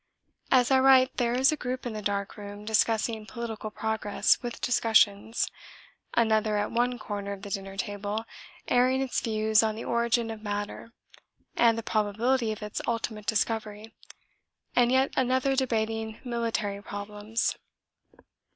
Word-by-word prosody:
As 255 -1 +4
I 265 - +6
write 260 0 +5
there 240 -1 +1
is 265 +4 +4
a - - 0
group 255 -3 -4
in 240 - -3
the 215 - -5
dark 200 -1 -2
room 205 0 -9
discussing 220 0 +1
political 225 -2 -5
progress 220 -1 +1
with 240 -2 -5
discussions 225 -2 +2 0.7
another 220 -2 +2
at 205 - -1
one 245 +1 +1
corner 205 -2 -5
of 195 0 -10
the 200 - -7
dinner 195 0 -5
table 205 +1 -3 0.4
airing 255 +2 +3
its 260 - -1
views 220 -1 +2
on 220 -1 0
the 225 - -6
origin 235 -1 +1
of 220 -1 -8
matter 205 +2 -4 0.6
and 230 -1 +4
the 230 - -3
probability 225 +3 +1
of 215 0 -6
its 210 - -4
ultimate 225 -2 -3
discovery, 220 -1 -1 0.8
and 245 0 +4
yet 265 +1 +2
another 260 +1 +2
debating 225 -3 -1
military 230 -5 -2
problems. 210 +2 -3
225 Hz, 145 wpm, -28 LUFS, 210-240 Hz, 0.8 s, I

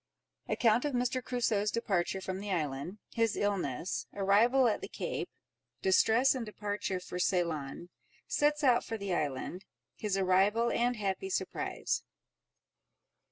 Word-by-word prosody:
Account 230 0 +3
of 295 -2 -1
Mr. 250 +1 0
Crusoe's 225 -5 0
Departure 195 -5 -1
from 190 0 -4
the 205 +1 -6
Island—His 180 - -2
Illness—Arrival 200 - +2
at 220 - 0
the - - -5
Cape—Distress, 225 +7 0
and 255 -3 -3
Departure 205 -3 -3
for 180 0 -6
Ceylon—Sets 180 - -1
out 250 -3 +4
for 225 - -4
the 200 -3 -3
Island—His 180 +7 -4
arrival, 195 +5 +3
and 245 +1 +1
happy 210 - -2
surprise. 380 - -2
205 Hz, 110 wpm, -32 LUFS, 185-235 Hz, -, out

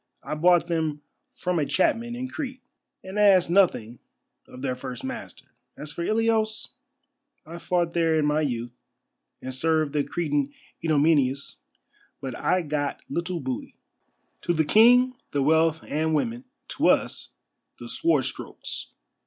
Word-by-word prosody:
I - - -4
bought 175 +2 +4
them 160 -3 -1 0.3
from 180 -2 -2
a 150 - +1
chapman 235 +5 +1
in 255 +1 -4
Crete, 260 -2 -6 0.4
and 190 +2 -5
asked 190 -5 +5
nothing 125 - +2 0.5
of 125 - -11
their 130 -2 0
first 125 0 -7
master. 235 - -7 0.3
As 150 - -7
for 170 - -4
Ilios, 220 +1 0 0.7
I 170 +2 -8
fought 175 -1 0
there 165 -2 +2
in 155 - +2
my 150 +1 +2
youth, 120 -4 -3 0.7
and 130 - -5
served 155 +1 +1
the 145 -1 +1
Cretan 145 -4 -1 0.3
Idomeneus, 145 -3 +2 0.6
but 130 -2 -5
I 185 +7 +1
got 145 -2 -2
little 170 +3 -2
booty. 130 -3 -5 0.7
To 175 - 0
the 160 -1 +1
King 245 - +6 0.2
the 140 -1 +1
wealth 160 +2 +3
and 160 +1 0
women, 235 - -2 0.2
to - - +1
us - - +1 0.5
the - - -9
sword 335 0 +1
strokes. - - -7
165 Hz, 145 wpm, -25 LUFS, 145-195 Hz, 0.7 s, King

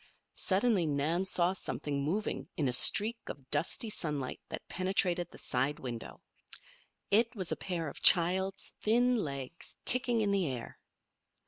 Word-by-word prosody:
Suddenly 195 -3 +1
Nan 155 +6 0
saw 180 -1 +2
something 145 -6 -3
moving 195 +9 -2
in 150 - +1
a 125 - 0
streak 220 - +4
of 135 -2 -9
dusty 215 +5 0
sunlight 150 -9 -2
that - - -6
penetrated 185 -2 0
the - - -14
side 135 +4 -1
window. 120 -3 -7 0.9
It 225 +3 +3
was 185 -5 -3
a - - +1
pair 170 -4 -3
of 145 - -8
child's 190 +3 +4
thin 245 +3 +3
legs 140 - -5
kicking 245 -2 +1
in 205 -2 +1
the 195 -4 +1
air! 125 -3 -6
180 Hz, 145 wpm, -32 LUFS, 145-205 Hz, 0.9 s, streak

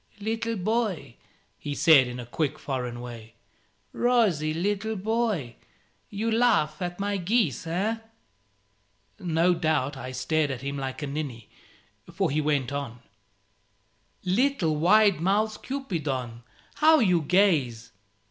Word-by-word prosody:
"Little 225 +2 -2
boy," 195 - -1 0.5
he 145 -1 -4
said, 145 -4 +6
in 125 0 -6
a 120 - -6
quick 150 +4 -2
foreign 125 -3 -4
way 115 -2 -10 0.6
"rosy 210 -11 +2
little 205 +6 -1
boy. 210 - -1 0.5
You 215 +3 -2
laugh 225 -8 +2
at 175 0 -4
my 200 0 -1
geese, 185 - 0
eh?" 195 +7 -1 1.2
No 170 0 +2
doubt 155 -5 0
I 130 -1 -6
stared 150 +4 0
at 130 -1 -5
him 140 +1 -3
like 135 +1 -5
a - - -1
ninny, 140 -6 -5 0.6
for - - 0
he 155 +2 +1
went 145 -4 0
on 135 -4 -5 1.2
"Little 190 - +1
wide 195 +3 +4
mouthed 210 +4 +1
Cupidon, 145 - -4 0.4
how 315 +1 +6
you 180 - +3
gaze! 145 - +1
165 Hz, 125 wpm, -26 LUFS, 135-210 Hz, 1.2 s, said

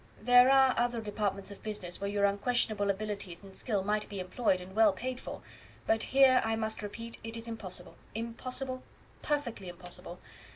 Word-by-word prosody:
"There 245 +2 +7
are 265 -1 +6
other 240 -1 +1
departments 205 -2 -2
of 200 - -11
business 200 -5 -4
where 200 - -1
your 200 0 +2
unquestionable 205 0 +1
abilities 200 -3 -3
and 195 -1 -12
skill 205 -6 0
might 210 +1 0
be 200 - -5
employed 185 +1 +1
and 185 +2 -10
well 220 -2 +6
paid 255 +4 -4
for; - - -7 0.4
but 220 0 +2
here, 265 -1 +6
I 225 0 +1
must 220 0 -2
repeat, 230 +3 -7
it 225 0 -5
is 230 0 -1
impossible 185 -6 -5 0.2
impossible 255 +3 -4 0.4
perfectly 245 -10 -2
impossible. 175 0 -8
215 Hz, 170 wpm, -31 LUFS, 200-240 Hz, 0.4 s, There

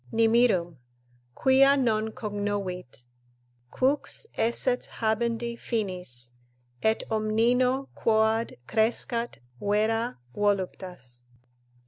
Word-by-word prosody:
"Nimirum, 225 - +3 0.6
quia 275 +1 +5
non 220 -4 +1
cognovit, 205 - -4 0.7
qux 275 - 0
esset 245 +2 +1
habendi 230 +1 0
Finis, 180 - -4 0.5
et 220 +1 +1
omnino 240 +5 +2
quoad 220 0 +1
crescat 230 - 0 0.2
vera 220 +3 0 0.2
voluptas." 185 -11 -2
220 Hz, 70 wpm, -27 LUFS, 200-235 Hz, 0.7 s, quia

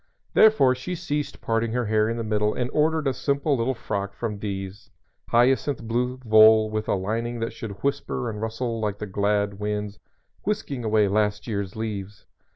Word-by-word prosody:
Therefore 215 -13 +6
she 130 +8 -5
ceased 145 -3 -3
parting 115 0 0
her 125 -1 0
hair 110 0 +2
in 115 - -2
the 115 - -2
middle 105 -1 0
and 125 0 -2
ordered 155 0 +2
a 135 - +2
simple 140 +2 0
little 125 +2 0
frock 100 -3 -4
from 105 -3 -4
D 95 -2 -3
's 95 +2 -16 0.4
hyacinth 130 +2 +2
blue 125 +3 -1
voile 110 0 +6
with 110 0 -2
a - - +2
lining 115 +5 -2
that 115 - -2
should 110 -3 -8
whisper 140 -3 -1
and 105 -2 -5
rustle 115 +1 -3
like 105 -2 -2
the 105 - -5
glad 100 0 0
winds 105 0 -3 0.4
whisking 170 - -2
away 110 -1 +3
last 105 +1 0
year's 100 -4 -3
leaves. 105 -2 -5
110 Hz, 180 wpm, -25 LUFS, 105-125 Hz, 0.4 s, Therefore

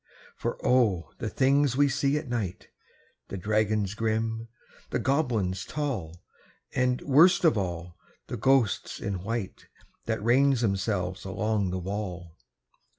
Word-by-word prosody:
For - - -3
O! 110 -9 +2
the 115 -4 -2
things 135 0 +2
we 145 0 +5
see 140 +1 +1
at 150 -1 -5
night 110 -7 -4 0.6
The 95 - -5
dragons 105 0 0
grim, 115 +1 -1 0.4
the - - 0
goblins 115 - 0
tall, 95 - -4 0.5
And, 125 -1 +1
worst 165 +7 +5
of 160 - +5
all, 90 -3 -4 0.3
the - - -5
ghosts 125 -2 +1
in 100 -2 -3
white 115 -2 -4 0.4
That 110 -2 -1
range 130 +2 +4
themselves 95 -3 -1
along 105 0 -1
the 90 - -2
wall! 90 -3 -5
110 Hz, 130 wpm, -27 LUFS, 95-130 Hz, 0.6 s, we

